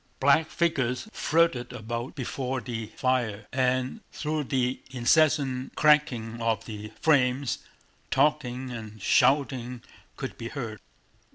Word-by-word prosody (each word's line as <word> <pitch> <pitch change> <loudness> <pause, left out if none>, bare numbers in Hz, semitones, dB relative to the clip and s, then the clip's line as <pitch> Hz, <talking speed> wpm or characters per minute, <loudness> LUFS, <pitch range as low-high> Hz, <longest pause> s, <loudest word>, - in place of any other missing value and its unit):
Black 140 +4 +4
figures 140 - 0
flitted 160 -7 +2
about 120 +3 -5
before 130 -1 -3
the 115 -3 -5
fire, 120 -5 0
and 130 - 0
through 155 -1 -2
the 130 0 0
incessant 135 0 +2
crackling 125 -7 +3
of 115 -1 0
the 105 -1 -7
flames 135 -3 +2 0.5
talking 130 -4 +1
and 110 -2 -8
shouting 125 +1 +2 0.3
could - - -6
be 115 - -4
heard. 115 -7 -5
125 Hz, 110 wpm, -27 LUFS, 120-140 Hz, 0.5 s, Black